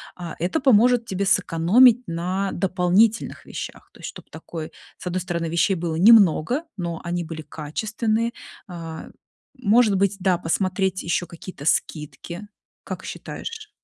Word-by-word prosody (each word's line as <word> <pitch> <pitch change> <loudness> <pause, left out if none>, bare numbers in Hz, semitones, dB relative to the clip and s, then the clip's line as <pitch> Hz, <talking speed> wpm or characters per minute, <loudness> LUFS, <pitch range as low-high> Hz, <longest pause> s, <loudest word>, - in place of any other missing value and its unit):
А, 175 -2 -7
это 180 - 0
поможет 245 -2 +4
тебе 195 -2 -2
сэкономить 195 +8 +5
на 185 +4 -2
дополнительных 190 +5 +1
вещах. - - -8
То - - -18
есть - - -6
чтоб - - -12
такой, 160 -2 -7 0.3
с - - -12
одной 180 +1 -1
стороны, 170 -2 -3
вещей 170 +4 +2
было 165 -2 -3
немного, 210 - +5
но 170 -3 -4
они 175 0 -2
были 160 -1 -7
качественные. 220 +10 -2 0.3
А, 165 -3 -8 0.5
может 225 -2 +4
быть, 195 +1 +1
да, 185 -1 +2
посмотреть 190 +2 -1
еще 170 +1 -1
какие-то 170 -3 -10
скидки, 170 +5 -2 0.4
как - - -7
считаешь? 440 -2 -7
185 Hz, 140 wpm, -23 LUFS, 170-215 Hz, 0.5 s, сэкономить